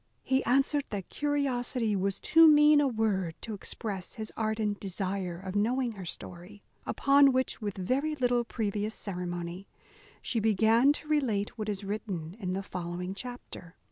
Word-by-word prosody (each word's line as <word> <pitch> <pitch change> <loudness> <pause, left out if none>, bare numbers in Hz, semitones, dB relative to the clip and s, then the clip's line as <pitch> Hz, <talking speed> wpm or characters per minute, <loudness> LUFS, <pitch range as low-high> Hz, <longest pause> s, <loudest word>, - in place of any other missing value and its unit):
He 265 +1 +1
answered, 275 +3 +2
that 195 -4 -5
curiosity 255 -6 0
was 195 0 -1
too 325 0 +6
mean 300 -1 +7
a 285 - +3
word 205 -8 0
to 225 - -5
express 200 -1 -5
his 220 -1 -6
ardent 215 -2 -1
desire 190 -2 -3
of 190 +1 -7
knowing 240 +4 +1
her 195 -4 -8
story. 180 +4 -8 0.2
Upon 275 0 +5
which, 260 -1 -1
with 205 -2 -4
very 270 +11 0
little 245 -3 +2
previous 215 -2 -2
ceremony, 175 -1 -5 0.5
she 235 - -1
began 225 +5 +4
to 300 - -8
relate 245 -10 0
what 215 -2 -4
is 200 -1 -3
written 195 -5 -4
in 185 -3 -2
the 195 +1 -3
following 180 0 -5
chapter. 200 -6 -9
215 Hz, 155 wpm, -29 LUFS, 190-255 Hz, 0.5 s, mean